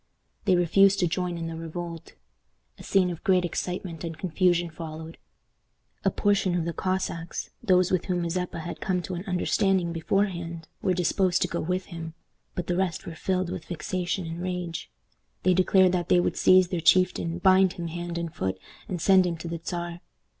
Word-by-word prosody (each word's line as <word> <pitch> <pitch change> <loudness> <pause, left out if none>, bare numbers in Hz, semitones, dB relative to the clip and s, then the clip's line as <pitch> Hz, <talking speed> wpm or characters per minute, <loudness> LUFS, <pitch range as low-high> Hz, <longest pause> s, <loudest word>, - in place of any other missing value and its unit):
They 185 - +4
refused 195 +3 +4
to 175 - +3
join 180 0 -2
in 165 - -4
the 165 0 -4
revolt. 165 0 -6 0.7
A - - -10
scene 185 -2 +2
of 170 - -8
great 185 -3 +3
excitement 175 -1 -4
and 165 -2 -5
confusion 175 0 +1
followed. 160 0 -8 0.8
A - - +4
portion 200 -3 +1
of 170 -2 0
the 170 - -2
Cossacks, 185 -3 -3
those 185 -5 +3
with 185 -2 +1
whom 180 -1 -1
Mazeppa 170 0 -2
had 170 +2 -7
come 180 -2 0
to 185 - -5
an 175 0 -4
understanding 180 -1 +1
beforehand, 170 -2 -1
were 185 - +1
disposed 185 +1 +2
to - - 0
go 170 - -3
with 180 +3 -1
him, 165 -1 -7 0.4
but 180 - -3
the 175 - -1
rest 180 -3 -1
were 170 - -6
filled 185 +2 -1
with 180 -3 -5
vexation 180 +2 -3
and 165 +1 -5
rage. 180 -2 -4 0.5
They 185 - +4
declared 185 0 +4
that 175 -2 -1
they 180 - +5
would - - 0
seize 185 -1 +5
their 175 -3 -2
chieftain, 175 -1 +3
bind 185 0 +5
him 170 - -6
hand 175 +1 -5
and 170 -1 -4
foot, 95 - -2 0.3
and 180 - -3
send 185 +1 +5
him 170 -1 -2
to 170 - -7
the 165 -1 -5
Czar. 175 0 -4
175 Hz, 190 wpm, -27 LUFS, 170-185 Hz, 0.8 s, they